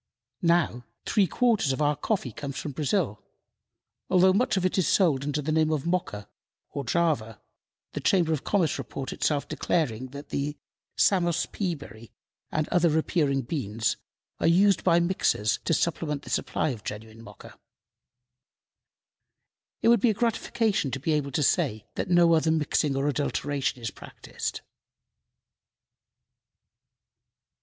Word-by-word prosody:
Now, 170 -8 +2 0.2
three 200 -3 +2
quarters 220 - +2
of 130 - -3
our 150 0 +2
coffee 180 - -2
comes 140 +4 -6
from 150 - -4
Brazil, 145 - -1 0.9
although 185 0 +5
much 215 0 +1
of 185 - 0
it 185 - +1
is 175 - +2
sold 155 -9 +3
under 145 +1 -2
the 155 - -1
name 160 0 +2
of 150 -2 -1
Mocha 170 - -2 0.4
or 140 - -4
Java, 140 -12 0 0.5
the - - -3
Chamber 170 -4 +2
of 150 - -3
Commerce 185 -6 +1
report 135 -1 -5
itself 145 -2 0
declaring 130 -7 -1
that 140 +3 -10
the 145 +1 -3 0.4
"Santos 175 -3 +2
pea 185 -5 -3
berry 115 -6 -12 0.4
and 155 0 -1
other 175 -1 +3
similar 160 +1 +2
appearing 140 -5 0
beans 115 -5 -2 0.4
are - - +2
used 190 +3 +4
by 170 -2 +4
mixers 170 - +1
to - - +2
supplement 150 -4 -1
the - - -9
supply - - 0
of 115 -6 -6
genuine 110 +1 -8
Mocha." - - -14 2.2
It - - +5
would 235 -3 +5
be 240 - +4
a 215 - +1
gratification 225 - 0
to 135 - -4
be 155 +4 -1
able 145 -2 0
to 145 +3 0
say 110 -4 +1
that - - -3
no 175 -1 +5
other 160 0 +3
mixing 150 -2 +1
or 135 +1 0
adulteration 145 -2 -1
is 115 -2 -4
practiced. - - -7
155 Hz, 150 wpm, -27 LUFS, 135-175 Hz, 2.2 s, although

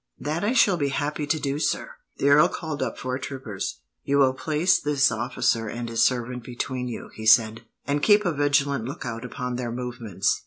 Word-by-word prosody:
"That 155 +5 -3
I 215 +4 +1
shall 205 -7 +4
be 145 -3 0
happy 145 +2 -2
to 155 +1 +1
do, 140 0 -2
sir." - - -1 0.3
The 140 - +2
earl 145 +2 +7
called 155 -3 -5
up - - -2
four 130 0 -3
troopers. 130 - -5 0.2
"You 140 - +1
will 135 -2 +4
place 155 +6 +1
this 140 -2 +2
officer 120 -2 0
and 120 +2 -5
his 115 0 +2
servant 125 -1 0
between 125 +1 -4
you," 120 - -7
he 110 0 -6
said, 110 0 +4 0.2
"and 145 +1 0
keep 210 +4 +5
a 175 - +2
vigilant 140 -3 +1
lookout 120 -3 -5
upon 125 0 -4
their 120 -2 -3
movements." 115 -5 -2
130 Hz, 195 wpm, -25 LUFS, 120-145 Hz, 0.3 s, earl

